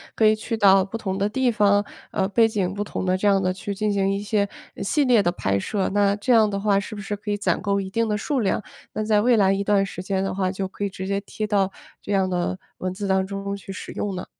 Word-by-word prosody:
可 220 - +3
以 215 - +6
去 225 +1 -4
到 195 -2 +6
不 205 +4 -5
同 190 -4 -3
的 200 +1 +1
地 255 +2 +1
方， 205 -2 +3 0.3
呃 190 - 0
背 225 +2 +4
景 195 -4 -1
不 205 - -2
同 200 - -4
的 185 0 +2
这 190 +2 0
样 195 -1 +4
地 185 0 +1
去 200 +2 -5
进 210 +1 0
行 195 -1 +1
一 195 - -1
些 205 -1 0 0.3
呃 - - -5
系 285 +8 +2
列 245 -4 +5
的 175 - +1
拍 100 - -1
摄， 195 - -1
那 200 -1 +3
这 210 +5 +1
样 220 -2 +5
的 200 -1 -2
话 200 -1 +2
是 210 +2 -6
不 205 - -6
是 205 +1 -3
可 205 +1 -8
以 205 - 0
攒 205 - 0
够 200 -1 0
一 195 - -4
定 230 +3 0
的 210 -1 0
数 275 +6 -1
量， 210 -1 0 0.3
那 215 - -2
在 215 -1 +3
未 235 +1 +4
来 195 -1 +4
一 195 +1 -1
段 200 -1 +3
时 185 - -7
间 190 0 -1
的 195 - -2
话 185 -1 0
就 190 0 -3
可 195 - -7
以 200 - 0
直 190 -1 -6
接 200 +1 -1
贴 215 +1 -5
到 200 -2 +1 0.3
这 205 - -6
样 190 -1 +2
的 180 0 -1 0.2
文 185 - -2
字 200 +2 -4
当 190 0 +2
中 200 0 -4
去 195 0 -9
使 190 - -7
用 200 -2 -3
呢？ 180 - -5
200 Hz, 310 characters per minute, -23 LUFS, 195-210 Hz, 0.3 s, 以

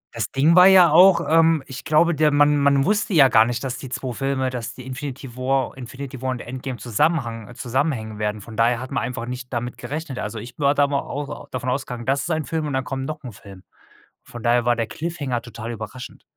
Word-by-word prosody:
Das - - -3
Ding 150 +5 +3
war 180 +1 +9
ja 185 -4 +7
auch 180 +3 +7
ähm, 165 -2 +4
ich 130 -2 -9
glaube, 170 +3 +3
der 155 0 +3
man 145 0 +4
man 140 -1 +3
wusste 210 -1 +1
ja 135 -4 +7
gar 110 -2 +6
nicht, 120 +2 -3
dass 125 -3 -4
die 135 - -8
2 130 0 -4
Filme, 130 0 -1
dass 120 -1 -5
die 130 - -11
Infinity 130 -1 -7
War 130 0 -1
Infinity 130 +1 -8
War 130 - -2
und 125 -1 -3
Endgame 130 +1 -6
zusammhang 120 -1 -1
zusammenhängen 120 -4 -2
werden. 105 0 -2
Von 110 +2 -11
daher 115 +1 +2
hat 130 +2 -7
man 135 - -1
einfach 120 -1 -4
nicht 125 +1 -7
damit 120 0 -3
gerechnet. 145 -3 -5
Also, 105 +1 -4
ich 120 +3 -8
war 140 0 +3
da 145 - +4
mal 140 -1 0
au 145 0 -6
davon 130 0 -4
ausgegangen, 125 -2 -3
das 135 +1 +1
ist 160 - -5
ein 160 -2 -1
Film 155 +3 -2
und 145 - -4
dann 130 0 0
kommen 135 0 -4
noch 155 +1 -6
'n 125 - -7
Film. 95 -1 -14 0.6
Von 120 - -10
daher 120 +1 +2
war 120 0 +2
der 115 -1 -1
Cliffhanger 145 -7 -3
total 115 0 -7
überraschend. 115 +3 -9
130 Hz, 230 wpm, -22 LUFS, 120-145 Hz, 0.6 s, war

